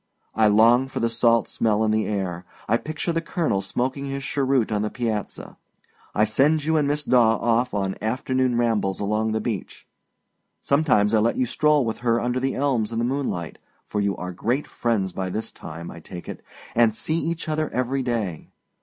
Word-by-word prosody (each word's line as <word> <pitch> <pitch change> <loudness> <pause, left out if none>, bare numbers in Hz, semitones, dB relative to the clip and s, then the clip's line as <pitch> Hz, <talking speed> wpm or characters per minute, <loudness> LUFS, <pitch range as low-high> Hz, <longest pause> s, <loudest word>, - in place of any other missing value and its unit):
I 110 -1 +4
long 115 +5 +5
for - - -5
the 115 0 0
salt 115 0 +3
smell 110 -1 +1
in 110 - +2
the 110 0 +1
air. 95 -4 -3 0.2
I 115 - +3
picture 155 +5 -3
the 165 - 0
colonel 165 - -1
smoking 130 +7 -2
his 140 0 -4
cheroot 135 -4 +1
on 105 -1 0
the 105 - -1
piazza. 110 -4 -4 0.6
I 105 - +4
send 145 +8 +2
you 160 +1 +2
and 150 -2 +2
Miss 150 +1 -1
Daw 120 -4 +4
off 120 +2 +1
on 95 -1 0
afternoon 130 +2 0
rambles 110 -5 +1
along 105 +2 0
the 110 - 0
beach. 110 -5 -5 0.7
Sometimes 130 -8 +2
I 110 - +5
let 115 +2 +1
you 130 - +2
stroll 150 +2 +2
with 110 - -3
her 120 -1 +2
under 125 +2 -1
the 135 +1 -1
elms 125 -6 0
in 115 - -3
the 115 - +1
moonlight, 125 - -3 0.3
for 105 - -2
you 100 -2 0
are 90 0 -5
great 120 +10 -1
friends 105 -6 -1
by 95 -1 -3
this 110 +4 -4
time, 85 +2 -8
I 85 - -10
take 85 +1 -10
it, - - -7 0.3
and 115 -2 +3
see 160 +7 -1
each 170 0 -3
other 155 0 -1
every 130 +2 -1
day. 110 -10 -3
115 Hz, 200 wpm, -24 LUFS, 105-135 Hz, 0.7 s, long